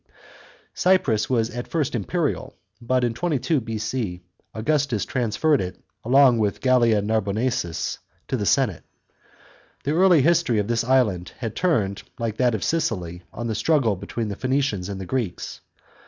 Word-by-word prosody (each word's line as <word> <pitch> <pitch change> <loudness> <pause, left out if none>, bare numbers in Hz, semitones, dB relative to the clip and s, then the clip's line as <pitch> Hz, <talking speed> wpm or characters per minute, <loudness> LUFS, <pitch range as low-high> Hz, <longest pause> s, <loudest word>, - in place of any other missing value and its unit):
C.). - - -8
Cyprus 130 - +3
was 115 -3 +1
fit 120 +1 -6
first 150 -3 -1
imperial, 140 - -2 0.3
but 125 +1 +1
in 120 -1 +1
22 145 +2 0
B.C. 110 -4 -3 0.3
Augustus 135 -1 0
transferred 130 +5 +1
it, 90 -1 -5 0.3
along 130 0 +5
with 105 -2 0
Gallia 120 -5 +3
Narbonensis, 110 -3 -1 0.3
to - - -1
the 105 -5 -2
senate. 125 - +2 1.0
The 140 - -1
early 175 -3 +5
history 165 -7 +3
of 105 -1 0
this 120 0 +1
island 110 -9 +1
had 115 -4 -5
turned, 110 - 0 0.2
like 115 -2 -3
that 125 -3 +2
of 105 - -3
Sicily, 90 - -1
on 120 - -6
the 115 - -1
struggle 120 -2 +2
between 105 +4 -4
the 100 - -4
Phoeni 130 +5 0
cians 100 -9 -2
and 100 -1 -5
the 95 - -5
Greeks. 115 -6 -3
120 Hz, 155 wpm, -23 LUFS, 105-135 Hz, 1.0 s, along